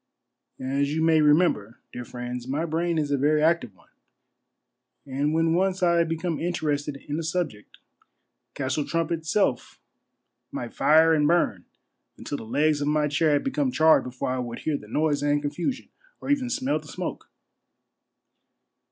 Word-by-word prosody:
As 140 Hz, +3 st, -1 dB
you 160 Hz, -, 0 dB
may 160 Hz, -1 st, +4 dB
remember, 150 Hz, -, +2 dB, 0.2 s
dear 125 Hz, -, -5 dB
friends, 125 Hz, 0 st, -6 dB
my 145 Hz, +5 st, -1 dB
brain 170 Hz, +1 st, -1 dB
is 150 Hz, -2 st, -1 dB
a 140 Hz, -, +1 dB
very 150 Hz, +2 st, +2 dB
active 160 Hz, -, +1 dB
one; -, -, -26 dB, 1.1 s
and 140 Hz, +2 st, -1 dB
when 165 Hz, +1 st, +2 dB
once 185 Hz, +1 st, +1 dB
I 170 Hz, -1 st, +4 dB
become 165 Hz, 0 st, -3 dB
interested 150 Hz, -4 st, -2 dB
in 150 Hz, +2 st, -2 dB
a -, -, -3 dB
subject, 160 Hz, -, -4 dB, 0.8 s
Castle 140 Hz, +2 st, -1 dB
Trump 165 Hz, +2 st, -2 dB
itself 160 Hz, -4 st, -1 dB, 0.7 s
might -, -, -5 dB
take -, -, -26 dB
tire 160 Hz, +1 st, +5 dB
and 150 Hz, -2 st, +3 dB
burn 175 Hz, +2 st, +1 dB, 0.5 s
until 145 Hz, -, -5 dB
the -, -, -9 dB
legs 150 Hz, +5 st, +1 dB
of 145 Hz, -, -1 dB
my 150 Hz, 0 st, +2 dB
chair 150 Hz, +1 st, +2 dB
had 145 Hz, -, +1 dB
become 270 Hz, 0 st, 0 dB
charred 160 Hz, -6 st, +5 dB
before 125 Hz, 0 st, -4 dB
I 130 Hz, -, -2 dB
would 120 Hz, -2 st, -5 dB
hear 155 Hz, -, -1 dB
the 105 Hz, -, -7 dB
noise 150 Hz, +5 st, 0 dB
and 145 Hz, 0 st, +2 dB
confusion, 150 Hz, -, -3 dB, 0.3 s
or -, -, -3 dB
even 265 Hz, -3 st, +1 dB
smell 260 Hz, +3 st, 0 dB
the -, -, -15 dB
smoke. -, -, -6 dB
155 Hz, 165 wpm, -25 LUFS, 140-165 Hz, 1.1 s, tire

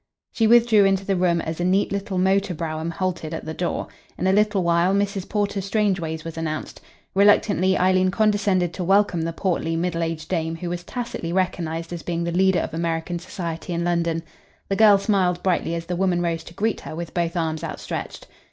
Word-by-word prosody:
She 225 Hz, -, +2 dB
withdrew 230 Hz, -2 st, +6 dB
into 195 Hz, 0 st, +2 dB
the 195 Hz, -, +1 dB
room 175 Hz, -2 st, +2 dB
as 160 Hz, +1 st, -5 dB
a -, -, 0 dB
neat 185 Hz, +3 st, +2 dB
little 200 Hz, -1 st, -3 dB
motor 190 Hz, 0 st, +2 dB
brougham 160 Hz, 0 st, -3 dB
halted 170 Hz, -2 st, -3 dB
at -, -, -7 dB
the 160 Hz, -, -4 dB
door. 175 Hz, +2 st, -2 dB, 0.3 s
In -, -, -2 dB
a 190 Hz, -, +3 dB
little 210 Hz, -2 st, +2 dB
while 170 Hz, +3 st, +3 dB
Mrs. 200 Hz, -1 st, -1 dB
Porter 205 Hz, -1 st, -1 dB
Strangeways 185 Hz, -6 st, -1 dB
was 165 Hz, 0 st, -6 dB
announced. 155 Hz, -1 st, -4 dB, 0.3 s
Reluctantly 200 Hz, -1 st, +4 dB
Eileen 185 Hz, 0 st, +3 dB
condescended 200 Hz, -4 st, +1 dB
to 185 Hz, -, -4 dB
welcome 195 Hz, -1 st, +3 dB
the 165 Hz, +1 st, -2 dB
portly, 165 Hz, -2 st, -1 dB
middle 170 Hz, 0 st, -1 dB
aged 165 Hz, -1 st, -3 dB
dame 165 Hz, -2 st, -1 dB
who 175 Hz, +1 st, -5 dB
was 175 Hz, 0 st, -4 dB
tacitly 235 Hz, -6 st, -5 dB
recognised 170 Hz, -2 st, -2 dB
as 170 Hz, -, -5 dB
being 170 Hz, -1 st, -2 dB
the 170 Hz, -, -2 dB
leader 190 Hz, +1 st, +3 dB
of -, -, -5 dB
American 165 Hz, +1 st, -2 dB
society 170 Hz, -1 st, -5 dB
in 170 Hz, 0 st, -1 dB
London. 170 Hz, -1 st, 0 dB, 0.5 s
The 195 Hz, -, +1 dB
girl 210 Hz, -1 st, +7 dB
smiled 190 Hz, -3 st, +1 dB
brightly 175 Hz, -2 st, 0 dB
as 165 Hz, 0 st, -4 dB
the 175 Hz, +1 st, -3 dB
woman 180 Hz, -1 st, +1 dB
rose 165 Hz, -1 st, -1 dB
to 170 Hz, -, -12 dB
greet 215 Hz, +3 st, -1 dB
her -, -, -7 dB
with 170 Hz, 0 st, -6 dB
both 170 Hz, 0 st, -1 dB
arms 160 Hz, -2 st, -2 dB
outstretched. -, -, -5 dB
180 Hz, 200 wpm, -23 LUFS, 165-195 Hz, 0.5 s, girl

